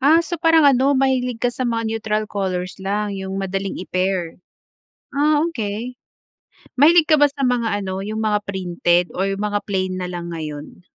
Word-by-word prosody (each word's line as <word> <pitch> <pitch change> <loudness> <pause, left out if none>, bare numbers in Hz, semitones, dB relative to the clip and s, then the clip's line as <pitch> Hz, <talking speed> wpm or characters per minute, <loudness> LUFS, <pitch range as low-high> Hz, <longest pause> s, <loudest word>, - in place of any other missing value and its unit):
Ah, 310 +5 +5
so 340 +1 -4
parang 325 -2 +5
ano, 275 0 +4
mahilig 255 -3 0
ka 245 - +2
sa 255 - -3
mga 230 -1 -1
neutral 220 -1 -1
colors 185 -2 -3
lang, 205 +1 -2
'yong 190 0 -5
madaling 195 0 -3
i-pair? 185 -2 -2 0.8
Ah, 295 +1 +3
okay. 235 -5 -4 0.8
Mahilig 320 +3 +6
ka 310 - +6
ba 290 0 +5
sa 275 -1 -2
mga 230 -4 0
ano, 190 0 -4
'yong 215 +2 -4
mga 210 -1 +1
printed 175 -2 +1
or 190 - -1
mga 205 0 -1
plain 185 -2 -2
na 180 - -3
lang 170 -1 -6
ngayon? 155 +1 -7
210 Hz, 170 wpm, -21 LUFS, 190-260 Hz, 0.8 s, Mahilig